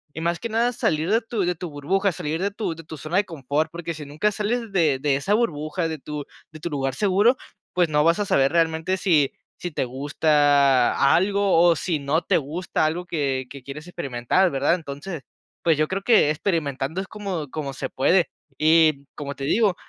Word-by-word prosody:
y 160 - -5
más 170 +1 0
que 235 - -4
nada 230 +2 +1
salir 160 -4 0
de 225 +2 +3
tu 225 -2 -3
de 180 0 +1
tu 175 +1 -7
burbuja, 185 +7 0
salir 160 0 -3
de 200 - +1
tu 205 -4 -3
de 165 0 -11
tu 160 0 -9
zona 155 +5 -2
de 200 - +3
confort, 150 -1 -2
porque 170 0 -5
si 155 -1 -8
nunca 150 +9 -1
sales 220 +2 -2
de 160 -8 +2
de 140 +1 +1
esa 190 +10 +1
burbuja, 165 -6 -1
de 160 -1 -5
tu 150 +1 -6 0.3
de 155 - -11
tu 170 +2 -5
lugar 135 -2 -2
seguro, 210 +5 +3 0.4
pues, 180 -1 +3
no 150 -1 +3
vas 165 +1 +4
a 205 - 0
saber 135 -7 +3
realmente 165 +2 +1
si 165 -8 +2 0.3
si 175 - -4
te 145 - -2
gusta 140 0 +3
algo, 200 +3 +2 0.3
o - - +6
o - - +2
si 160 +1 -2
no 145 +4 0
te - - +2
gusta 160 +5 -2
algo 170 +3 -1
que 140 -6 -1
que 140 +1 -10
quieres 140 +4 -8
experimentar, 170 +1 0
¿verdad? 140 +2 +1
Entonces, 160 0 -5 0.4
pues, 165 -3 +3
yo 155 0 +2
creo 190 +3 -3
que 205 -9 +4
experimentando 155 -2 -2
es 190 - -4
como 190 -9 -5
como 145 -3 -4
se 135 -1 -5
puede. 175 +7 +2 0.3
Y 155 -2 +4
como 140 -1 -6
te 135 - -7
digo, 200 +6 +2
160 Hz, 210 wpm, -23 LUFS, 145-185 Hz, 0.4 s, o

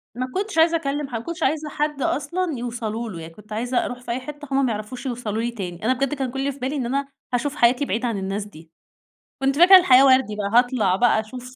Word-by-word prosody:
ما 255 +1 -3
كنتش 395 -1 -3
عايزة 325 +1 +5
أكلم 290 -2 -3
حد 235 -4 -3
ما 230 - -11
كنتش 335 0 -4
عايزة 300 +2 0
حد 295 -1 -2
أصلًا 335 +2 -1
يوصلوا 235 -1 -4
له، 175 -5 -7
يعني 165 0 -10
كنت 210 +3 -12
عايزة 245 +3 -1
أروح 245 - -5
في 245 - -6
أي 240 - -1
حِتّة 290 +3 -9
هُم 270 0 +2
ما 240 - 0
يعرفوش 215 +5 -6
يوصلوا 230 -4 -3
لي 240 +1 -2
تاني، 185 -4 -6
أنا 255 - +3
بجد 275 +2 -1
كان 265 -3 -3
كُلّ 270 - -5
اللي 275 +1 0
في 275 - -13
بالي 265 +3 -2
إن 265 -4 -2
أنا 275 +3 -1 0.3
هاشوف 285 +4 -1
حياتي 245 +3 +3
بعيد 230 +1 -2
عن 230 -4 -1
الناس 195 +1 -3
دي، 160 -5 -15 0.7
كنت 270 0 +1
فاكرة 370 +3 +9
الحياة 275 -7 +6
وردي 260 -5 +4
بقى 200 -1 -3
هاطلع 245 -7 +1
بقى 235 +2 +3
أشوف 250 +3 -8
250 Hz, 250 wpm, -22 LUFS, 220-280 Hz, 0.7 s, فاكرة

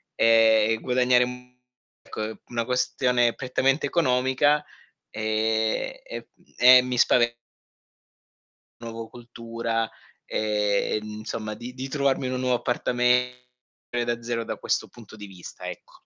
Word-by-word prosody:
e 110 -1 +5
e - - -1
guadagnare 125 0 +3
un 125 0 -7 0.6
co 110 - -4
è 110 - -8
una 115 -1 -2
questione 125 -1 +1
prettamente 135 +2 0
economica 140 0 +2 0.5
e 110 - -1
e - - -6
mhmm, - - -29
e 125 +1 +8
mi 125 0 -3
spave 120 0 +3 1.4
Nuovo 115 -1 -7
cultura, 115 -1 -4 0.4
e, 105 -1 0
ehm, 110 - -9
insomma 110 0 -5
di 120 +3 -8
di 130 +1 -6
trovarmi 140 -1 0
in 130 - -3
un 130 - -2
nuovo 125 -1 +2
appartame 125 0 +1 0.5
e 120 0 +1
da 120 0 -2
zero 115 0 -2
da - - -4
questo - - -1
punto 115 -3 -15
di 105 -1 -9
vista, 95 -3 -10
ecco. - - -10
120 Hz, 140 wpm, -25 LUFS, 115-125 Hz, 1.4 s, e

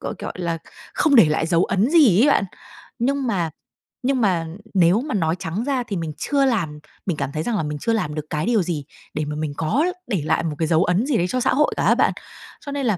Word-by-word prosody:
gọi - - -4
gọi - - -5
là 170 -2 -2 0.4
không 305 -4 +3
để 225 - +9
lại 155 +1 0
dấu 170 +1 +3
ấn 200 +7 +1
gì 275 - +6
ấy 290 - +5
bạn. 240 - +3 0.5
Nhưng 270 +3 0
mà 180 -8 0 0.6
nhưng 265 -2 +1
mà 180 -6 +1 0.3
nếu 185 +3 +4
mà 295 -2 -3
nói 165 -4 +1
trắng 175 +8 -3
ra 265 -2 0
thì 225 -4 -5
mình 165 -2 -4
chưa 280 -1 +1
làm 175 - -1 0.3
mình 175 -6 -1
cảm - - -3
thấy 155 +2 -3
rằng 235 - -1
là 160 - -1
mình 150 0 -3
chưa 230 - 0
làm 155 -10 -1
được 155 -1 -4
cái 155 +1 -2
điều 225 -5 +2
gì 160 -5 -3 0.3
để 155 0 -2
mà 150 0 -4
mình 150 -1 -3
có 220 - +1 0.2
để 195 -9 -1
lại 155 - +1
một 160 -3 -2
cái 160 - +1
dấu 165 +1 +3
ấn 180 +6 +1
gì 275 -5 +1
đấy 175 - +1
cho 255 - 0
xã 250 - +2
hội 300 +3 +3
cả - - 0
á - - +5
bạn. - - +2 0.5
Cho 285 - -5
nên 280 -1 -2
là 215 -5 +1
185 Hz, 265 wpm, -22 LUFS, 160-250 Hz, 0.6 s, để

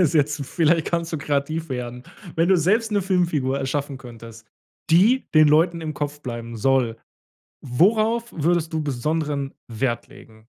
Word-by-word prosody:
das 180 - +5
ist - - -7
jetzt 145 -2 +1
vielleicht 165 -1 +2
kannst 170 -1 -2
du 160 - -1
kreativ 150 +2 -2
werden. 125 -1 -5 0.3
Wenn 165 +2 +2
du 190 - +5
selbst 215 +7 +1
‘ne 200 -2 +2
Filmfigur 170 -8 0
erschaffen 140 0 -3
könntest, 115 -3 -12 0.4
die 220 +10 +4
den 155 -1 +7
Leuten 165 +3 +3
im 155 -1 -4
Kopf 145 0 -4
bleiben 115 -3 -6
soll, 125 -1 +1 0.7
worauf 220 - +2
würdest 165 +1 0
du 160 -1 -1
besonderen 145 +1 -2
Wert 120 +1 -2
legen? 110 0 -17
150 Hz, 160 wpm, -23 LUFS, 130-170 Hz, 0.7 s, den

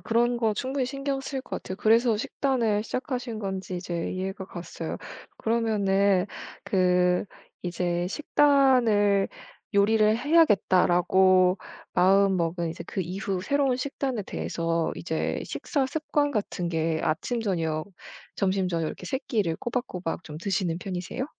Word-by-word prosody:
그런 240 +1 +1
거 220 -2 +1
충분히 260 +3 -1
신경 275 +1 -3
쓰일 270 -1 -4
것 - - -6
같아요. 185 - -6
그래서 225 +2 +4
식단을 230 -2 0
시작하신 250 -2 -3
건지 190 -2 -4
이제 175 -2 -3
이해가 190 +1 -4
갔어요. 170 -2 -6 0.4
그러면은 200 -4 +2 0.4
그 180 -1 +2 0.4
이제 175 0 -1
식단을 245 -7 +3 0.5
'요리를 215 +1 +4
해야겠다.'라고 185 - +4 0.4
마음먹은 180 -3 +3
이제 165 - -7
그 - - -3
이후 185 +1 -3
새로운 275 +2 +1
식단에 260 -3 -2
대해서 165 -3 -2
이제 160 -1 -2
식사 280 -4 -1
습관 290 0 0
같은 205 -7 -2
게 160 -1 0
아침 165 +10 -1
저녁 165 -6 -1 0.5
점심 190 -1 +1
저녁 165 -2 -1
이렇게 180 - -6
3 265 - -1
끼를 200 - 0
꼬박꼬박 190 -9 -4
좀 150 -1 -8
드시는 180 -2 -1
편이세요? 185 +7 -4
195 Hz, 295 characters per minute, -26 LUFS, 180-240 Hz, 0.5 s, 그래서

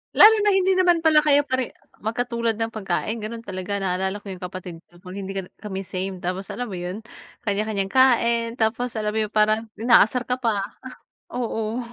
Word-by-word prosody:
Lalo 445 +1 +9
na 415 0 +3
hindi 380 0 +3
naman 350 -3 +3
pala 310 -1 +6
kayo 290 -1 +4
pare 260 -3 -2 0.2
magkatulad 235 0 -1
ng 225 +1 -2
pagkain, 215 +2 -2
ganun 225 +2 -6
talaga. 185 0 -4
Naalala 190 +2 -1
ko 200 - -8
yung 185 - -8
kapatid 180 -2 -7
ko, 175 0 -21
'pag 180 +1 -9
hindi 195 0 -5
ka 195 - -1
na - - -35
kami 195 -2 -5
same. 185 0 -5
Tapos 185 +2 -3
alam 245 -2 -5
mo 185 - -4
yun? 180 +5 -5 0.4
Kanya-kanyang 205 -2 -1
kain. 235 -3 +3
Tapos, 240 +1 0
alam 210 -1 -1
mo 220 - -1
yun 210 - -11
parang 215 +1 +2
inaasar 240 +1 +4
ka 250 +1 -2
pa, 215 -5 0 0.7
oo. 230 -1 -2
220 Hz, 190 wpm, -23 LUFS, 195-245 Hz, 0.7 s, Lalo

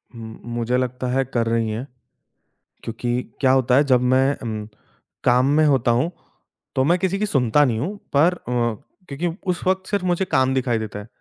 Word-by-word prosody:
हुँ, 110 -1 -9
मुझे 120 +1 -1
लगता 125 0 -2
है 135 +1 +2
कर 120 -3 -1
रही 115 -1 0
हैं। 110 +5 -4 1.0
क्योंकि 120 +2 -2 0.2
क्या 130 - +4
होता 130 -1 +3
है 140 - +5
जब 130 -4 +3
मैं 135 +2 +3
अम 110 -3 -5 0.6
काम 125 +1 +4
में 155 - +5
होता 130 -5 +3
हूँ, 130 +9 +1 0.6
तो 130 - +3
मैं 170 +6 +3
किसी 190 +1 -1
की 210 - +1
सुनता 135 - +3
नहीं 115 -4 0
हूँ 195 - -3 0.2
पर 160 +6 +5
अ, 120 -7 -2 0.3
क्योंकि 145 +5 -2 0.2
उस 175 - -4
वक़्त 190 0 0
सिर्फ़ 200 -2 -1
मुझे 180 +1 +1
काम 130 -5 +2
दिखाई 125 -3 0
देता 105 -1 -6
है। 105 - -10
130 Hz, 195 wpm, -22 LUFS, 120-150 Hz, 1.0 s, है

